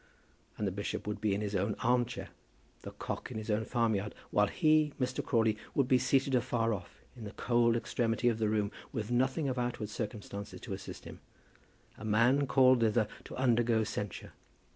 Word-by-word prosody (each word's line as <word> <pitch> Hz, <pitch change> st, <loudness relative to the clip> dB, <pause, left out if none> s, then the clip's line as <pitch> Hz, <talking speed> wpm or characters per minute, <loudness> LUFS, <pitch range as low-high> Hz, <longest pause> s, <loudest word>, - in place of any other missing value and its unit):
And 105 Hz, -, -1 dB
the 95 Hz, -, 0 dB
bishop 100 Hz, +2 st, -4 dB
would 105 Hz, -1 st, -4 dB
be 105 Hz, -2 st, +1 dB
in 100 Hz, -, -2 dB
his 105 Hz, -1 st, -2 dB
own 100 Hz, +3 st, 0 dB
arm 120 Hz, +1 st, +3 dB
chair, 120 Hz, -, -7 dB, 0.5 s
the -, -, -7 dB
cock -, -, -5 dB
in 120 Hz, -, -6 dB
his 110 Hz, 0 st, -3 dB
own 110 Hz, +1 st, 0 dB
farmyard, 110 Hz, -4 st, 0 dB, 0.2 s
while 105 Hz, 0 st, +4 dB
he, 155 Hz, -, +3 dB
Mr. 130 Hz, 0 st, -1 dB
Crawley, 110 Hz, -3 st, +2 dB, 0.2 s
would 135 Hz, -3 st, +3 dB
be 130 Hz, -1 st, +4 dB
seated 135 Hz, +1 st, +2 dB
afar 115 Hz, -2 st, +1 dB
off, 100 Hz, -, -8 dB
in 120 Hz, -, -9 dB
the 105 Hz, 0 st, -7 dB
cold 120 Hz, -1 st, +2 dB
extremity 115 Hz, 0 st, 0 dB
of 115 Hz, -2 st, +2 dB
the 110 Hz, -1 st, +1 dB
room, 105 Hz, -1 st, 0 dB, 0.2 s
with 110 Hz, 0 st, -4 dB
nothing 130 Hz, +4 st, +1 dB
of 130 Hz, -1 st, -1 dB
outward 120 Hz, -3 st, -2 dB
circumstances 105 Hz, -2 st, -6 dB
to 105 Hz, -, -5 dB
assist 100 Hz, +1 st, -8 dB
him, -, -, -9 dB, 0.8 s
a -, -, -9 dB
man 120 Hz, +6 st, +3 dB
called 130 Hz, -1 st, +5 dB
thither 110 Hz, -1 st, +2 dB, 0.2 s
to -, -, -8 dB
undergo 120 Hz, -3 st, +2 dB
censure. 105 Hz, -2 st, -5 dB
115 Hz, 190 wpm, -32 LUFS, 105-125 Hz, 0.8 s, called